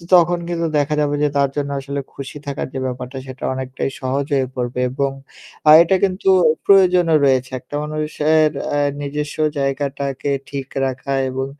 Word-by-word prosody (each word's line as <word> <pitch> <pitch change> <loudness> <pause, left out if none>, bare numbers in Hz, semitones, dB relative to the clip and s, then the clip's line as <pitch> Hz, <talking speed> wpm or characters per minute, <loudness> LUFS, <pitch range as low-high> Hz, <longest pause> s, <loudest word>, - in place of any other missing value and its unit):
তখন 175 0 +4
কিন্তু 170 -1 -1
দেখা 145 +1 +1
যাবে 145 0 +1
যে 150 - +3
তার 140 -1 +3
জন্য 145 -1 -2
আসলে 140 +1 -4
খুশি 140 +1 -8
থাকার 140 -1 -4
যে 135 - -3
ব্যাপারটা 125 +1 -5
সেটা 130 0 -9
অনেকটাই 130 +1 -3
সহজ 135 +2 -1
হয়ে 135 -2 +1
পড়বে 125 0 -3
এবং 140 +1 -1 0.6
আর 150 - +10
এটা 180 +3 +2
কিন্তু 190 0 +1 0.4
প্রয়োজনও 180 -4 +5
রয়েছে 130 -1 +2
একটা 130 +4 -9
মানুষের 155 0 +1 0.2
অ্যা 145 0 +1 0.2
নিজস্ব 145 +1 -4 0.2
জায়গাটাকে 140 0 -2 0.2
ঠিক 140 -1 -5 0.2
রাখা 130 +1 -3 0.2
এবং 130 +1 -3
140 Hz, 160 wpm, -19 LUFS, 135-150 Hz, 0.6 s, আর